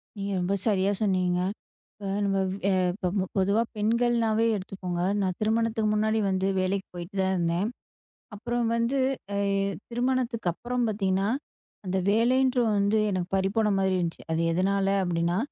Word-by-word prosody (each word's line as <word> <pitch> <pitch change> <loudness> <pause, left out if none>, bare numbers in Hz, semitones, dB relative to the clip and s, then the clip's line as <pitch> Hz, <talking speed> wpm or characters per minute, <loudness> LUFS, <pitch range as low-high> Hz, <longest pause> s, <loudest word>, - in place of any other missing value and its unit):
நீங்க 200 -1 -4
ரொம்ப 180 +2 0
சரியா 200 -1 +2
சொன்னீங்கங்க! 180 -3 +1 0.5
இப்ப 200 -2 -8 0.2
நம்ம 195 -1 +1 0.3
அ - - +3 0.2
இப்ப 185 0 -1
பொதுவா 200 +3 +3 0.2
பெண்கள்னாவே 230 0 +2
எடுத்துக்கோங்க. 185 -2 -4 0.2
நான் 185 -2 -1
திருமணத்துக்கு 220 0 +1
முன்னாடி 215 +1 +1
வந்து 190 0 0
வேலைக்குப் 190 +1 -2
போயிட்டு 175 +3 -7
தான் 190 0 +1
இருந்தேன். 170 +3 0 0.7
அப்புறம் 240 +2 -2
வந்து 235 +4 0 0.4
அ - - 0 0.5
திருமணத்துக்கு 240 -4 0
அப்புறம் 245 +5 -2
பாத்தீங்கன்னா, 195 -1 0 0.6
அந்த 185 +1 -1
வேலைன்ற 250 +3 +3 0.2
வந்து 200 +2 +2
எனக்கு 185 -1 -2
பறிபோன 210 +3 +1
மாரி 190 -1 +2
இருந்துச்சு. 170 -1 -3
அது 165 +1 +1
எதனால 195 +2 +1 0.2
அப்படின்னா, 170 0 0
200 Hz, 135 wpm, -27 LUFS, 185-225 Hz, 0.7 s, அ